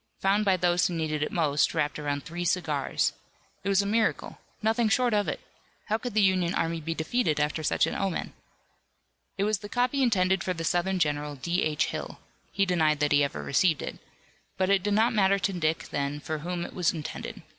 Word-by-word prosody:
Found 200 +2 +2
by 190 -2 +3
those 175 0 +2
who 175 - -4
needed 155 -2 -2
it 150 - -1
most 150 -4 +1
wrapped 150 +1 0
around 145 -1 -2
three 175 +1 -5
cigars! 160 -6 0 0.5
It 200 - -1
was 195 0 +3
a - - -4
miracle! 220 +2 0 0.2
Nothing 225 +1 +2
short 245 +1 +2
of 205 -1 +1
it! - - -2 0.5
How 220 +1 +1
could 245 -3 -5
the 215 - +4
Union 185 -2 +2
army 165 0 -1
be 165 +1 -3
defeated 160 -2 0
after 150 +1 0
such 155 - +2
an - - -3
omen? 195 -3 -2 1.0
It 195 - 0
was 210 -1 +1
the 205 - -9
copy 250 +4 +1
intended 190 -6 +2
for 185 - -2
the 165 - -4
Southern 175 +3 +1
general, 150 -3 -1
D. 170 +7 -1
H. 150 -1 +1
Hill - - -5 0.3
he 195 - +1
denied 160 -5 +2
that 150 0 +1
he 145 0 +5
ever 140 - -3
received 160 +2 +2
it - - -6 0.6
but 190 +1 +1
it 195 -1 +4
did 205 +2 0
not 225 +3 +3
matter 200 -2 +3
to 195 0 -1
Dick 160 -2 -1
then 140 +1 -2
for 155 +1 -4
whom 175 +2 -3
it - - -9
was 180 -3 +1
intended. 155 -3 -6
175 Hz, 210 wpm, -27 LUFS, 155-200 Hz, 1.0 s, he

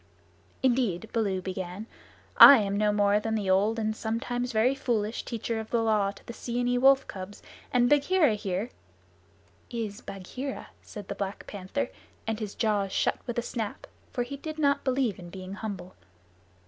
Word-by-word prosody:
"Indeed," 235 -6 +1
Baloo 200 -5 0
began, 185 +2 -5 0.5
"I 280 - +11
am 200 -2 0
no 210 0 +2
more 205 0 +3
than 220 +1 -2
the 200 -3 0
old 205 +4 +3
and 220 -1 -1
sometimes 245 +2 -2
very 225 +4 +3
foolish 230 -5 -1
Teacher 230 -1 -3
of 220 - -7
the 235 -1 +1
Law 210 -3 +2
to 200 - -11
the 235 - -7
Seeonee 245 +1 -1
wolf 270 +1 +5
cubs, 190 +1 -8 0.3
and 245 -1 +4
Bagheera 295 0 +4
here 205 +2 -3 0.5
" - - -33
"Is 225 -2 -4
Bagheera," 250 +9 -6
said 205 -2 -10
the - - -3
Black 200 0 -5
Panther, 185 - -4 0.4
and 225 -1 -2
his 210 -3 -5
jaws 205 -4 0
shut - - +1
with 240 - -3
a 240 - 0
snap, 225 -4 -4 0.3
for 245 - -1
he 280 +3 -7
did 310 +2 -6
not 280 -2 +2
believe 255 -6 0
in 175 -1 -9
being 185 +1 -8
humble. 200 -3 -6
220 Hz, 175 wpm, -28 LUFS, 200-245 Hz, 0.5 s, I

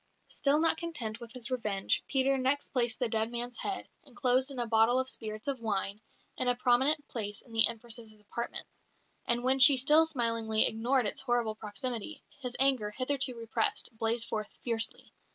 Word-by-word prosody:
Still 285 +2 +3
not 325 0 +2
content 260 -11 -4
with 235 -1 -10
his 255 0 -5
revenge, 210 -6 0
Peter 270 0 +2
next 265 +2 0
placed 240 -4 0
the 245 - 0
dead 220 0 0
man's 240 0 -5
head, 390 -1 -4 0.2
enclosed 255 0 +1
in 275 - -5
a 240 - 0
bottle 225 +2 +3
of 260 0 0
spirits 215 +2 -6
of 275 -3 -2
wine, 205 -2 -3 0.4
in 255 - -1
a 245 - +3
prominent 265 +5 +2
place 205 -3 -5
in 240 - -19
the 225 -1 +6
Empress's 230 -1 -7
apartments; 215 +3 -7 0.5
and 240 0 +1
when 260 +1 +2
she 270 +1 +10
still 300 +5 +5
smilingly 230 -5 +2
ignored 245 +3 +1
its 205 - -1
horrible 240 -4 0
proximity, 225 +6 -5 0.2
his 250 -2 -4
anger, 260 -6 +2
hitherto 255 +3 -1
repressed, 230 0 -1
blazed 225 +1 -1
forth 215 -1 -4
fiercely. 230 -2 -1
240 Hz, 175 wpm, -30 LUFS, 225-265 Hz, 0.5 s, she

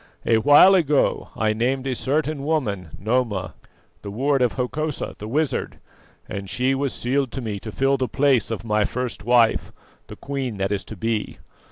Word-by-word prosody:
"A 115 -1 +4
while 145 - +7
ago 150 -6 +2
I 110 -1 +1
named 130 +4 -1
a 135 - -1
certain 145 +3 -1
woman, 110 - -1
Noma, 110 -3 -1 0.5
the 100 - -7
ward 135 +6 0
of 125 -2 +2
Hokosa 145 +4 -3
the 105 - -6
wizard, 150 +5 -1 0.5
and 100 -1 -6
she 130 +5 +1
was 135 0 -1
sealed 130 +1 -1
to - - -4
me 105 -4 -4
to 110 +2 -7
fill 135 +4 +1
the 130 -1 -1
place 135 -5 +2
of 115 0 -4
my 105 -1 +2
first 125 +1 -3
wife, 120 0 +3 0.4
the - - -9
queen 135 -6 -4
that 95 +1 -1
is 100 -1 -1
to 110 - -9
be. 115 +2 -2
125 Hz, 180 wpm, -23 LUFS, 110-140 Hz, 0.5 s, while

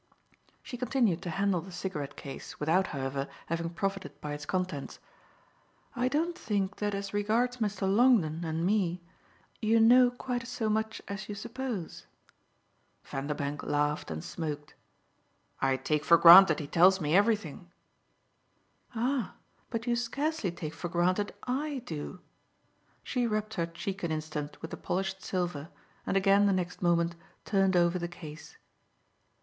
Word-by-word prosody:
She 245 - -7
continued 235 -8 +1
to 175 - -5
handle 195 0 +1
the 190 +3 -11
cigarette 150 -6 -5
case, 140 - -9
without, 170 +5 +2
however, 135 0 -3 0.2
having 165 0 -2
profited 195 -4 -4
by 150 -1 -5
its 145 0 -7
contents. 185 -7 -3 1.0
"I 250 +1 +1
don't 320 +6 0
think 200 - -2
that 205 -1 -1
as 200 0 -5
regards 225 +5 +1
Mr. 210 -4 -2
Longdon 195 -6 +3
and 165 +1 -2
me 180 -3 +1 0.6
you 225 +1 +3
know 245 +2 +7
quite 245 -1 -4
so 245 -3 -2
much 220 +1 -1
as 200 +1 -6
you 205 - -4
suppose." 235 -4 -5 1.0
Vanderbank 145 +1 -3
laughed 145 +1 -1
and 80 -1 -5
smoked. 150 -3 -5 0.9
"I 135 -1 +2
take 150 +3 -1
for 170 - +6
granted 170 -1 +9
he 150 - -4
tells 185 +6 +5
me 155 0 +1
everything." 200 -5 +1 1.3
"Ah 245 0 -1 0.3
but 230 -1 -3
you 240 -1 +1
scarcely 275 - -1
take 165 -2 -6
for 175 - -5
granted 185 +4 +1
I 270 +1 -2
do!" 165 +2 -6 0.8
She 245 -2 0
rubbed 215 0 -2
her 170 -5 -1
cheek 190 +4 -5
an 170 - -2
instant 155 -1 -4
with 160 - -6
the - - -5
polished 190 +1 -2
silver 175 -5 -3 0.4
and 195 - +2
again 200 +1 +4
the 200 - +3
next 180 -1 -3
moment 170 -1 +2 0.3
turned 195 -3 +2
over 175 +1 +3
the 175 - -2
case. 160 -3 -11
190 Hz, 145 wpm, -30 LUFS, 160-220 Hz, 1.3 s, granted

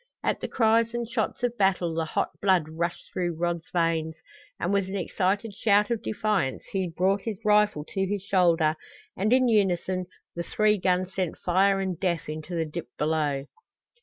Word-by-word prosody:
At - - 0
the - - -2
cries 230 0 +2
and 240 -1 -2
shots 230 0 -2
of 240 -1 0
battle 185 -4 +2
the 160 0 -1
hot 155 - -1
blood 185 -5 +3
rushed 170 +2 -4
through 175 -2 -1
Rod's 170 -1 -2
veins, 165 -2 0 0.4
and 180 +4 0
with 200 -2 +1
an 190 - -5
excited 200 +3 -1
shout 205 +1 +2
of 230 - 0
defiance 210 -11 -1
he 190 -2 -1
brought 190 +4 +1
his 220 -2 -4
rifle 210 -7 +3
to 195 0 -1
his 200 -1 -2
shoulder 170 -5 +3 0.4
and 205 +4 0
in 255 0 +5
unison 185 -4 +1 0.3
the 170 - -2
three 210 +4 +2
guns 185 0 0
sent 185 -4 -2
fire 195 +2 +2
and 190 -3 -2
death 175 -5 -1
into 155 +3 -5
the 165 -1 0
dip 155 0 -6
below. 150 -3 0
185 Hz, 180 wpm, -26 LUFS, 170-205 Hz, 0.4 s, in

